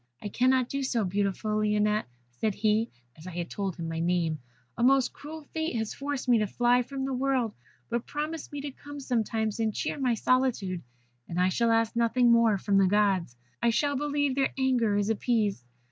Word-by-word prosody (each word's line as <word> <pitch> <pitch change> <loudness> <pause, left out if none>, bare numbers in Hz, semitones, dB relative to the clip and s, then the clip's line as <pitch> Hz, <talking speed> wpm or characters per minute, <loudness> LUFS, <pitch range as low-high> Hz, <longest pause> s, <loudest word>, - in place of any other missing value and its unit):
'I 205 - -3
cannot 255 +2 +2
do 275 +2 -3
so, 250 -4 0
beautiful 205 +3 -1
Lionette,' 210 0 +1 0.2
said 195 - -2
he 215 +2 +1 0.3
(I 185 - -7
had 175 -1 -5
told 195 -3 -3
him 165 -2 -5
my 165 0 -3
name), 165 -2 0 0.4
'a - - -4
most 265 +1 +4
cruel 310 +2 -9
fate 315 -4 -2
has 220 -2 -2
forced 280 -1 -4
me 240 -2 +5
to 210 - +1
fly 245 +4 +3
from 265 +2 -4
the 270 - -2
world; 255 -3 0 0.3
but 235 0 -3
promise 305 +2 -4
me 290 -1 -5
to 285 0 -5
come 290 +2 -10
sometimes 225 -4 -1
and 220 -1 +1
cheer - - -2
my 250 -3 +2
solitude, 225 -8 +1 0.5
and 175 - -2
I 180 +1 +4
shall 235 +5 +1
ask 225 0 +2
nothing 235 +1 +3
more 230 -3 +4
from 195 +1 +2
the 195 - +5
Gods. 195 -8 +2 0.3
I 235 - +3
shall 285 +5 +1
believe 290 0 0
their 270 0 +1
anger 250 -6 +2
is 205 +1 +1
appeased.' 215 - 0
230 Hz, 195 wpm, -28 LUFS, 205-265 Hz, 0.5 s, me